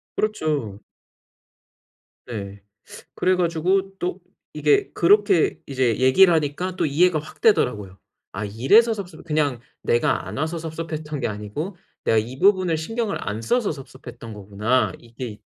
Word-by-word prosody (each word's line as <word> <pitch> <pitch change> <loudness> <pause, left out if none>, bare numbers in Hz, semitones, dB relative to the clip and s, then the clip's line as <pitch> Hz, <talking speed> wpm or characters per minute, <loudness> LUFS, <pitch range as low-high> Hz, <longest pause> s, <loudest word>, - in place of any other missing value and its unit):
그렇죠. 150 - -2 1.4
네 100 -4 -7 0.5
그래 185 0 +2
가지고 185 +3 0
또 175 +1 -3 0.3
이게 150 -1 +2
그렇게 200 -2 +3
이제 130 -5 0
얘기를 170 +8 +6
하니까 160 +4 -1
또 - - 0
이해가 160 +3 +3
확 155 - -12
되더라고요. 105 - +2 0.4
'아 105 +2 -3
이래서 135 - +4
섭섭 180 -6 -8
그냥 150 -6 0 0.2
내가 120 - +1
안 - - -6
와서 160 +4 -2
섭섭했던 155 -2 -5
게 - - -1
아니고 105 - -5 0.3
내가 115 - +3
이 120 +5 -2
부분을 185 -4 +3
신경을 225 +6 -2
안 105 +2 -3
써서 240 - +1
섭섭했던 130 -5 -10
거구나.' 105 +5 0
이게 115 -2 -8
150 Hz, 290 characters per minute, -23 LUFS, 115-180 Hz, 1.4 s, 얘기를